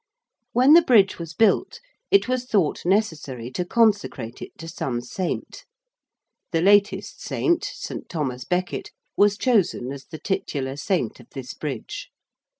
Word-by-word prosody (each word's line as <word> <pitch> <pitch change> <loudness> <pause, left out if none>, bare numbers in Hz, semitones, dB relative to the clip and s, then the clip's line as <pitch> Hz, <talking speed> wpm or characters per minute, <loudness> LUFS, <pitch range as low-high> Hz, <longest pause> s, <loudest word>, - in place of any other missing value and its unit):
When 255 +5 +6
the 340 - +9
Bridge 215 - +4
was 165 0 -7
built 225 - +2 0.3
it 400 -6 +4
was 255 0 -1
thought 190 -8 0
necessary 150 - -1
to 180 - -2
consecrate 200 - +1
it - - -9
to 165 - -8
some 135 -7 -3
saint. 170 +9 -4 0.9
The 165 - +1
latest 205 +1 +3
saint, 345 -1 0
St. - - -6
Thomas 130 -7 -3
Becket, 180 +4 -2 0.3
was 205 0 +4
chosen 205 - +1
as 140 -1 -8
the 160 - -9
titular 140 -6 -3
saint 160 - -1
of - - -15
this 130 -1 -6
Bridge. 135 -7 -6
180 Hz, 145 wpm, -24 LUFS, 135-215 Hz, 0.9 s, the